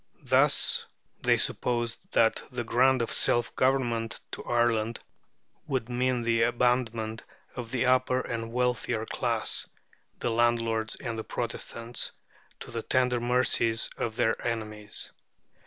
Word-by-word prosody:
Thus - - +3 0.3
they - - +4
supposed 120 -1 -1
that 115 -1 +3
the 125 -1 -3
grant 125 +2 +3
of - - -4
self 120 0 +2
government 120 -4 +1
to - - -6
Ireland 120 -1 +1 0.7
would 130 -5 -2
mean 125 0 0
the 115 0 +2
abandonment 115 -2 +1 0.3
of 120 -3 -6
the 125 +1 0
upper 130 0 +3
and 115 -2 -4
wealthier 125 -2 0
class, - - +1 0.5
the 120 - -1
landlords 115 -1 +1
and 115 -3 -5
the - - -3
Protestants, 120 0 -4 0.5
to - - -8
the 115 - -3
tender 125 0 +1
mercies 120 -2 +2
of 110 -2 -3
their 115 -2 +2
enemies. 110 -3 -4
120 Hz, 125 wpm, -28 LUFS, 115-125 Hz, 0.7 s, they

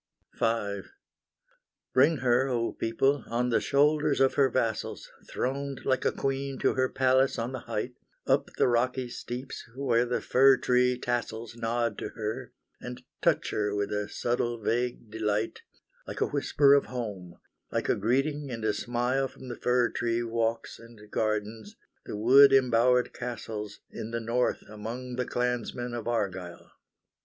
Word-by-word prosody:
V 105 -3 -1 1.1
Bring 145 +5 +5
her, 125 +2 +4
O 120 -3 -1
people, 135 +5 +1
on 120 +1 0
the 115 - +2
shoulders 150 +1 +2
of 135 0 +4
her 135 -2 +4
vassals 115 -4 -2 0.2
Throned 135 +1 -3
like 130 -1 +1
a - - +3
queen 135 0 -2
to - - +2
her 130 -1 +1
palace 130 +1 +2
on 115 +2 -2
the 130 - -4
height, 115 +2 -4 0.3
Up - - +2
the - - +4
rocky 125 +1 +1
steeps 125 +2 -6
where 125 -3 +2
the 125 - 0
fir 135 +1 +5
tree 125 0 +2
tassels 120 -2 -3
Nod 115 -1 -1
to - - -4
her, 110 -1 -4 0.3
and - - -8 0.2
touch - - +2
her 105 -1 -1
with 100 0 -1
a 105 0 -2
subtle, 120 -1 -1
vague 120 0 -2
delight, 110 0 -1 0.5
Like - - -6
a - - +4
whisper 140 -1 +4
of 140 - +4
home, 100 -8 -6 0.4
like - - -1
a - - +4
greeting 135 +7 0
and 115 -3 -4
a 110 - +2
smile 120 +5 0
From 130 0 -12
the 120 - -4
fir 125 0 +2
tree 120 0 -1
walks 115 0 -2
and 115 -1 -15
gardens, 110 - -2 0.3
the - - -4
wood 135 +6 +7
embowered 125 -1 +4
castles 110 -4 -6
In 110 - -6
the 115 0 -2
north 115 +2 0
among 120 +4 -6
the 125 - 0
clansmen 125 0 -2
of 120 -2 -5
Argyle. 95 -7 -3
120 Hz, 155 wpm, -28 LUFS, 115-130 Hz, 1.1 s, wood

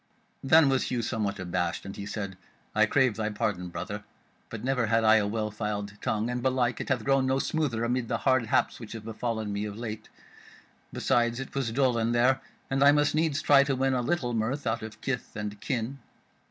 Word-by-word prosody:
Then 155 +2 +6
was 135 -1 +2
Hugh 120 -2 -1
somewhat 105 -4 -2
abashed, 90 -2 -2
and 100 - -7
he 100 - -6
said: 100 -3 -4 0.4
"I 110 +1 +4
crave 130 -4 +2
thy 110 -1 -1
pardon, 100 -4 -2
brother, 105 +4 -5 0.5
but 110 -1 -7
never 125 -3 +1
had 115 +1 +2
I 110 0 +6
a 105 -2 +1
well 110 0 -2
filed 105 -1 -3
tongue, 110 -2 0
and 125 0 -2
belike 125 -2 +1
it - - -6
hath 130 -4 +1
grown 135 0 +2
no 130 0 +2
smoother 135 -6 -1
amid 120 0 0
the - - 0
hard 130 -4 +2
haps - - +1
which 115 -2 -8
have 110 -2 -8
befallen 110 -2 -3
me 100 +1 -2
of 105 0 -6
late. 110 -2 -6 0.8
Besides 120 -2 +1
it 135 - -7
was 135 -5 -1
dull 125 -1 +2
in 115 +1 +1
there, 130 +3 +3 0.3
and 135 +1 +1
I 140 - +8
must 145 0 +3
needs 155 -1 +1
try 140 -1 +6
to 140 -1 0
win 135 +1 +1
a 125 - +1
little 125 -3 -1
mirth 120 +6 -1
out 115 0 0
of 110 0 -9
kith 135 -2 -3
and 105 -1 -5
kin." 130 0 -2
120 Hz, 215 wpm, -28 LUFS, 110-135 Hz, 0.8 s, I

